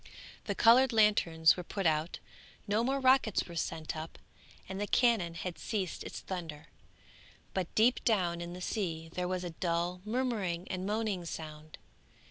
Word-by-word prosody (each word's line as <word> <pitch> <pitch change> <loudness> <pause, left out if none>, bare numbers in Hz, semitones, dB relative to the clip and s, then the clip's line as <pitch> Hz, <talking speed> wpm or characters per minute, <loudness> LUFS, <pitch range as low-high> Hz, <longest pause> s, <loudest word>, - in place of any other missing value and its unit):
The - - -2
coloured 245 +3 +6
lanterns 200 -8 +4
were 180 - -5
put 195 +2 -4
out, 155 +1 +1 0.5
no 210 +3 +2
more 270 +3 0
rockets 260 -5 +4
were 170 - -10
sent 160 -1 -3
up, 160 +1 -7 0.5
and 190 +1 -5
the 205 - -1
cannon 215 -10 +2
had 180 0 -5
ceased 195 -5 -3
its - - -7
thunder, 165 -5 -6 0.8
but 185 -3 -3
deep 235 +3 +4
down 180 -7 +1
in 175 0 -6
the 180 - -8
sea 165 -6 -3
there 180 0 -2
was 185 0 -2
a 175 - -4
dull 175 +1 -1
murmuring 210 -7 -2
and 185 +1 -3
moaning 210 -4 -1
sound. 155 -1 -8
180 Hz, 160 wpm, -32 LUFS, 170-215 Hz, 0.8 s, coloured